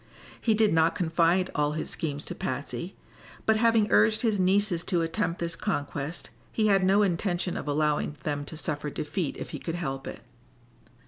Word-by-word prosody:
He 220 -2 +3
did 215 -3 +3
not 160 0 +3
confide 170 +2 +2
all 150 0 +1
his 155 - -3
schemes 145 -2 -3
to - - -5
Patsy, - - -4 0.5
but 220 0 +4
having 225 -1 +4
urged 215 +2 +4
his 220 -4 +2
nieces 185 -1 +2
to 175 -3 +1
attempt 170 +1 -1
this 170 -1 -1
conquest 145 +2 -3 0.2
he 220 - +1
had 195 -3 +4
no 195 +3 +4
intention 180 -1 0
of - - -5
allowing 150 0 0
them 145 -1 -2
to 160 - -8
suffer 150 0 -2
defeat 150 +2 -3
if - - -7
he - - -5
could 165 - -4
help 135 -6 -4
it. - - -7
170 Hz, 180 wpm, -27 LUFS, 150-200 Hz, 0.5 s, but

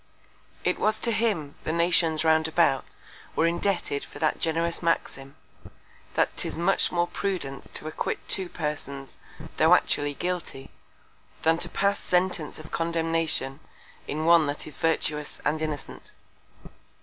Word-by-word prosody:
It - - +1
was 215 0 +2
to 235 - +2
him, 210 -11 0
the - - -1
Nations 165 -1 +2
round 160 0 +4
about 160 -5 +3 0.5
were 165 - +3
indebted 170 -4 0
for - - -11
that 155 -2 +1
generous 165 +1 0
Maxim; 145 -4 -1 0.8
_that - - +3
'tis - - -3
much 175 +3 +2
more 175 0 +2
Prudence 175 -8 -3
to - - -4
acquit 155 - -2
two 190 -2 -1
Persons, 145 -4 -5 0.4
tho' - - +7
actually 145 0 0
guilty, 175 -7 -4 0.7
than 165 +1 +4
to 175 - -1
pass 200 +3 +1
Sentence 180 -4 0
of 155 0 -11
Condemnation 165 -4 0 0.5
in 155 +2 -2
one 165 -2 +6
that 145 +1 -3
is 155 - -8
virtuous 150 -2 -1
and 155 +1 +1
innocent_. 155 -2 -5
160 Hz, 135 wpm, -27 LUFS, 150-175 Hz, 0.8 s, tho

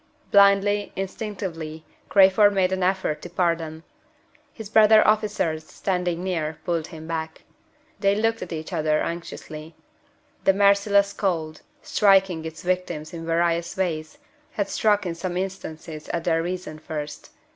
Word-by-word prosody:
Blindly, 200 +1 +4
instinctively, 185 -6 -5 0.2
Crayford 200 +1 +5
made 185 -1 +2
an 190 0 -1
effort 185 -4 0
to 175 - -8
part 170 -1 +1
them. 160 0 -8 0.7
His 220 -3 -9
brother 215 0 +6
officers, 210 -7 0
standing 180 -2 -2
near, 160 -4 -2
pulled 170 -3 -1
him 160 -2 -10
back. 160 -1 -5 0.6
They 200 -1 +3
looked 225 +2 0
at - - -6
each 160 +2 -5
other 155 -2 +1
anxiously. 165 -2 -7 0.7
The 195 - +4
merciless 200 0 +4
cold, 160 -5 -2 0.2
striking 190 -5 +3
its 160 0 -8
victims 180 -4 -2
in 165 -1 -7
various 170 +1 0
ways, 160 - -2 0.4
had 205 -2 -2
struck 205 -2 +2
in 175 - -2
some 175 +1 -4
instances 160 -4 -6
at 170 - -2
their 165 -1 +1
reason 175 -3 -5
first. 150 -1 -6
180 Hz, 140 wpm, -24 LUFS, 160-200 Hz, 0.7 s, brother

